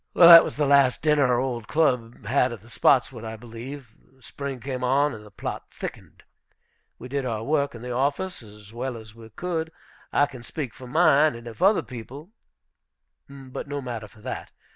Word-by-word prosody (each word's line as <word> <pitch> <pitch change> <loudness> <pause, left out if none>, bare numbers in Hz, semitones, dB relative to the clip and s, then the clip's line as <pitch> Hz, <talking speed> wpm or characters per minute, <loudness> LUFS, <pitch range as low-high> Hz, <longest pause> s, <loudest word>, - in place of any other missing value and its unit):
That 170 -1 +10
was - - -5
the 150 - +1
last 140 -2 +4
dinner 150 -3 +4
our 125 -1 +2
old 125 -4 -3
club 125 -8 0
had 125 +2 +2
at 115 -5 -8
the 115 +2 -18
Spotswood, 125 -2 +2
I 110 0 -6
believe. 120 +2 -9 0.2
The 130 - -25
spring 140 0 -6
came 130 0 -5
on, 140 +3 +2
and 105 - -10
the 105 - -14
plot 100 - -6
thickened. - - -9 0.7
We 125 - -9
did 140 +1 -2
our 115 -3 -3
work 140 -1 0
in 115 - -10
the 125 - -5
office 140 +9 -1
as 105 -1 -15
well 125 +1 -4
as 110 -1 -12
we 115 -1 -13
could; 160 +6 -3 0.4
I 145 - +4
can 130 -4 -11
speak 130 +1 -6
for 130 - -11
mine, 155 -1 +4
and 115 0 -11
if 115 +7 -10
other 200 +3 +4
people 135 - -10 1.0
but 135 0 -8
no 145 0 -3
matter 120 -5 -6
for 105 +2 -20
that! - - -6
130 Hz, 195 wpm, -25 LUFS, 115-145 Hz, 1.0 s, That